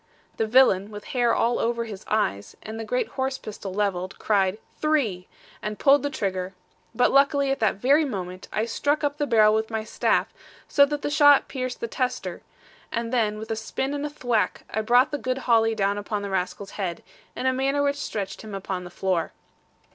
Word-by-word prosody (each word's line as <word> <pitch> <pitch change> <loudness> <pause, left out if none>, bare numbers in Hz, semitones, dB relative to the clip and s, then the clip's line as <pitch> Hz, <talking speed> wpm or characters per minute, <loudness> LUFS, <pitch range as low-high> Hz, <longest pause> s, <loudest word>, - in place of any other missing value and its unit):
The 225 - 0
villain, 215 -5 +4
with 210 -1 -8
hair 240 -2 +3
all 235 +1 +1
over 235 0 0
his 210 -3 -8
eyes, 100 - -1
and 220 +1 -7
the - - -3
great 250 +3 -1
horse 265 0 -2
pistol 205 -2 -7
levelled, 190 -2 -2
cried 195 -2 +1 0.2
'three,' 245 -13 0 0.3
and 210 0 -4
pulled 280 +1 +5
the 285 - -1
trigger; 190 -7 -3 0.4
but 250 - +3
luckily, 275 0 +3
at 270 - -1
that 220 - +2
very 275 +10 +3
moment, 185 -8 -5
I 215 - 0
struck 290 +6 0
up 290 +1 -1
the 290 - 0
barrel 215 -3 +5
with 220 0 0
my 220 -1 -2
staff, - - 0 0.3
so 280 -1 +5
that 295 0 -4
the 290 - -1
shot 290 -1 +6
pierced 255 -2 -4
the 235 - -2
tester, 255 +1 -3 0.5
and 230 +1 -3
then 215 -4 +1
with 220 +1 -7
a - - 0
spin 265 +5 -3
and 290 0 -3
a 295 - -2
thwack 245 -7 -1
I 220 - 0
brought 245 +6 +4
the 290 - -2
good 255 0 -2
holly 225 -3 +2
down 200 -1 0
upon 205 0 -3
the 200 - -4
rascal's 190 +1 -3
head, 175 -3 -3 0.3
in - - -4
a 260 - +3
manner 275 +2 +1
which 285 0 +1
stretched 205 -8 -4
him 215 -2 -7
upon 190 -2 -4
the - - -8
floor. 185 -1 -1
225 Hz, 205 wpm, -25 LUFS, 200-270 Hz, 0.5 s, shot